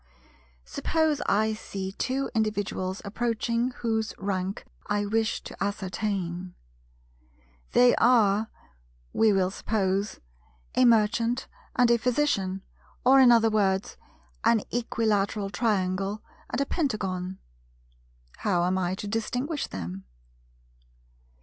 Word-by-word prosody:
Suppose 310 - 0
I 220 +2 +2
see 195 -3 -5
two 265 +6 -2
individuals 205 -4 -1
approaching 235 +2 -1
whose 225 -3 -2
rank 195 0 -3 0.2
I 205 0 0
wish 220 +1 0
to - - -6
ascertain. 190 -3 -3 1.2
They 245 0 +6
are, 220 -3 +4 0.6
we 220 -1 +4
will 190 -2 +2
suppose, 200 -1 -1 0.5
a 255 - +4
Merchant 230 +2 +3 0.3
and 245 -1 +4
a 235 - +4
Physician, 215 -7 0 0.4
or 265 +2 +7
in 255 -2 +8
other 225 -1 +5
words, 195 -2 +1 0.5
an 225 -2 +4
Equilateral 215 -4 0
Triangle 195 -2 0 0.3
and - - -2
a 280 - +2
Pentagon; 190 - -2 1.0
how 180 -4 +1
am 185 +1 +1
I 180 0 -1
to 205 - -6
distinguish 250 +8 -2
them? 95 +1 -6
210 Hz, 105 wpm, -27 LUFS, 190-235 Hz, 1.2 s, in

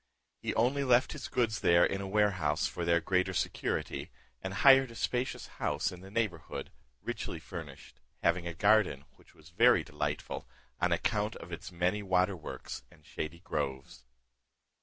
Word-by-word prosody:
He - - -3
only 130 +5 +2
left 125 -1 +4
his - - -6
goods 115 -3 0
there 85 0 +5
in 100 - -1
a 100 - -4
warehouse 95 -7 +2
for 85 - -3
their 85 0 +4
greater 90 +2 +1
security, - - -2 0.3
and 95 - -4
hired 135 +5 +6
a 115 - -11
spacious 125 +2 -1 0.2
house 75 +6 0
in 90 - -9
the 95 - -11
neighbourhood, 100 -7 -3 0.3
richly - - -4
furnished, - - -9 0.2
having 85 +1 +2
a 85 - -5
garden 100 -7 +3
which - - -22
was 80 +1 -17
very 105 -1 +5
delightful, 75 - -4 0.3
on - - +2
account 105 +1 0
of 85 - -10
its 85 +2 -7
many 90 +4 0
waterworks 90 -3 -1
and 75 - -21
shady 80 +2 -5
groves. 65 -6 -4
95 Hz, 160 wpm, -31 LUFS, 85-110 Hz, 0.3 s, hired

